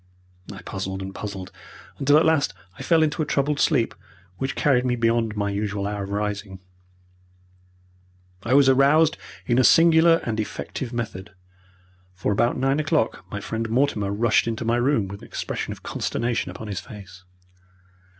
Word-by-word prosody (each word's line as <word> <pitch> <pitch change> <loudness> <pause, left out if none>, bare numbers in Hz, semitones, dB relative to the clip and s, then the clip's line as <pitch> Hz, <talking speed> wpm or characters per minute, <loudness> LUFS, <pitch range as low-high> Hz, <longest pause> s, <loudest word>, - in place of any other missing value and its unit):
I - - -10
puzzled 95 0 -5
and 95 0 -7
puzzled 95 -3 -7 0.5
until 145 +2 +4
at 155 - +4
last 160 -3 +2 0.2
I - - -10
fell 165 -2 +3
into 155 0 0
a - - 0
troubled 145 +1 0
sleep, 130 -8 +2 0.5
which 135 0 -2
carried 130 -4 +2
me 125 -1 0
beyond 115 -2 +1
my 100 -1 -1
usual 100 0 -2
hour 100 0 -3
of 100 - -5
rising. 100 -1 -3 1.8
I 120 +5 +1
was 140 -1 +6
aroused 140 +4 +4 0.3
in 120 0 +2
a - - +5
singular 165 +2 +6
and 110 -2 -3
effective 115 +3 -5
method, 105 -4 -5 0.8
for 95 - -1
about 120 +4 +1
nine 135 +3 +1
o'clock 155 - 0
my 100 - -5
friend 115 +2 -4
Mortimer 115 -5 +1
rushed 110 +3 +2
into 115 0 -3
my 115 +1 +2
room 120 -5 +1
with 100 +1 -9
an - - -12
expression - - -4
of - - -9
consternation 120 0 -2
upon 110 - -8
his 100 -4 -4
face. 100 -5 -12
115 Hz, 165 wpm, -23 LUFS, 100-140 Hz, 1.8 s, was